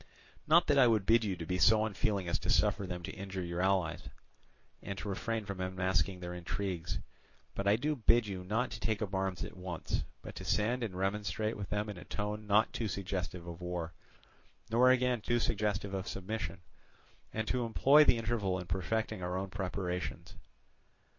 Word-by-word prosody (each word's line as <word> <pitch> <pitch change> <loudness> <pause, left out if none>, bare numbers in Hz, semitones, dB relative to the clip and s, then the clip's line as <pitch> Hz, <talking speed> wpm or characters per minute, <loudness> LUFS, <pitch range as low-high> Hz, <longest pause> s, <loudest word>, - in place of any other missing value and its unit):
"Not 170 +2 +6
that 145 -2 +4
I 125 - +7
would 110 -4 +3
bid 115 +2 +5
you 95 -4 -1
be 90 +2 -2
so 110 +5 +6
unfeeling 100 -2 -1
as 85 - 0
to - - -4
suffer 100 - +3
them 90 -1 -5
to - - -4
injure 95 -1 -5
your 85 0 -2
allies, 95 -3 +1 0.7
and 100 - -5
to - - -5
refrain 110 +2 -2
from 100 -2 -5
unmasking 95 -1 0
their 90 0 -5
intrigues; 90 -1 -3 0.6
but 100 - -2
I 100 - +6
do 150 +7 0
bid 120 -2 +4
you 95 -3 -5
not 110 +7 0
to - - -6
take 110 -1 0
up 100 - -5
arms 95 -2 -1
at - - -7
once, 90 -3 -3 0.2
but - - -7
to - - -6
send 115 +4 +1
and 110 -6 -3
remonstrate 105 +3 -1
with 100 -2 -6
them 105 +1 -1
in 105 -3 -6
a - - -9
tone 105 0 -4
not 105 +2 +4
too 115 - -1
suggestive 90 -3 -3
of 85 0 -8
war, 90 -1 -3 0.8
nor 125 +3 +6
again 125 -2 +3
too 120 +3 +1
suggestive 105 -3 0
of 95 0 -3
submission, 100 -1 -4 0.7
and 110 0 -2
to 125 -1 +1
employ 135 +6 +6
the 125 - +5
interval 110 -5 0
in 90 - -5
perfecting 95 +4 -1
our 90 +1 -2
own 95 0 -4
preparations. 90 -2 -3
100 Hz, 190 wpm, -33 LUFS, 90-110 Hz, 0.8 s, I